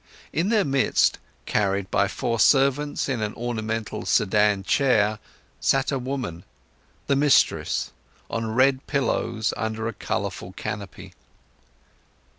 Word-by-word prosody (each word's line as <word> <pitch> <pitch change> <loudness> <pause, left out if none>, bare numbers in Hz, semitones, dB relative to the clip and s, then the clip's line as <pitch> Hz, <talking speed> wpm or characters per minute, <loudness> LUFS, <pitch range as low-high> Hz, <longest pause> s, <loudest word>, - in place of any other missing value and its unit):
In 175 +5 0
their 220 -3 +3
midst, 135 -2 +2 0.3
carried 100 -2 0
by 100 - +2
four 115 +3 -2
servants 140 +3 +3
in 130 -5 -2
an 105 -1 -3
ornamental 115 -2 -3
sedan 105 0 +2
chair, 110 -3 +2 0.4
sat 135 +1 +1
a 135 - -1
woman, 125 -10 -4 0.6
the 140 - +2
mistress, 145 0 +2 0.4
on 115 -1 -3
red 130 +1 +3
pillows 115 -5 0
under 110 0 -3
a 115 - -3
colourful 95 -2 -4
canopy. 100 -2 -7
115 Hz, 115 wpm, -24 LUFS, 105-135 Hz, 0.6 s, their